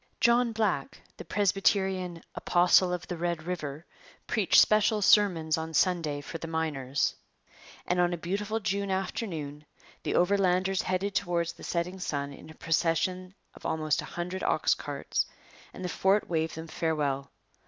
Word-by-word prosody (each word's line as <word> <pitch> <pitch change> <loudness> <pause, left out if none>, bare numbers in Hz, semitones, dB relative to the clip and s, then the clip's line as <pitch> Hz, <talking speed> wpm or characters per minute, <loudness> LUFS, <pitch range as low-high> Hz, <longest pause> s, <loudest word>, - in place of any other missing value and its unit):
John 235 0 +4
Black, 210 -11 -1 0.2
the - - -7
Presbyterian 190 -1 +1
'apostle 180 +1 +4
of 180 -1 -4
the 175 - -4
Red 170 -1 -2
River,' 160 -3 -5 0.4
preached - - +4
special 215 0 +4
sermons 175 -6 +4
on 160 0 -5
Sunday 155 -3 +1
for 165 +3 -7
the 165 - -6
miners. 145 -5 -1 0.7
And 180 0 0
on 175 0 +3
a 175 - -2
beautiful 200 +6 -2
June 200 -1 -1
afternoon 175 -6 -3 0.4
the - - -2
Overlanders 190 0 +2
headed 185 +2 -1
towards 170 -2 0
the - - -14
setting 180 +2 -2
sun 140 -5 -3
in 155 - -13
a 160 - -12
procession 180 +4 0 0.2
of - - -16
almost 155 -1 0
a - - -7
hundred 180 +2 -5
ox - - +2
carts; - - -2 0.4
and 185 - -7
the - - 0
fort 190 +4 +2
waved 160 -1 -1
them 160 0 -6
farewell. 150 -4 -1
175 Hz, 155 wpm, -29 LUFS, 160-190 Hz, 0.7 s, John